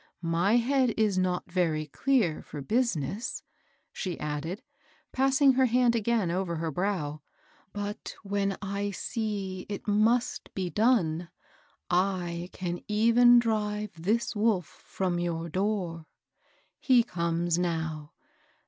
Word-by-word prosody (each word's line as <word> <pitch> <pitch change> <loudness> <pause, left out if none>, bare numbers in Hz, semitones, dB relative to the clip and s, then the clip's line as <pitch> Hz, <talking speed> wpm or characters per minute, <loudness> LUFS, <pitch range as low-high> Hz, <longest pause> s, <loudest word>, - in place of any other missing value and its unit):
My 185 +7 +3
head 250 0 +2
is 210 -4 +2
not 180 -1 -1
very 165 -4 +1
clear 205 - +1
for 150 - -8
business," 210 - -1 0.5
she 180 -4 -4
added, 150 - -4 0.5
p£»ssing 270 +1 +4
her 260 -1 +5
hand 245 0 +3
again 225 -5 +1
over 180 -1 -1
het 160 -1 -3
brow; 165 -5 -2 0.3
" 305 -1 -33
but 205 0 -5
when 200 -1 -1
I 200 +1 -2
see 200 -2 -4
it 205 +1 -6
must 220 +4 +1
be 185 -2 -2
done, 180 -8 +2 0.6
I 180 -1 0
can 175 -1 -4
even 235 +3 +6
drive 210 -3 0
this 210 +9 -1
wolf 205 -5 +2
from 180 +2 -3
your 170 -1 -2
door. 180 -3 -2 0.7
He 255 -4 +4
comes 170 -3 -1
now. 160 -3 -2
195 Hz, 120 wpm, -28 LUFS, 170-225 Hz, 0.7 s, even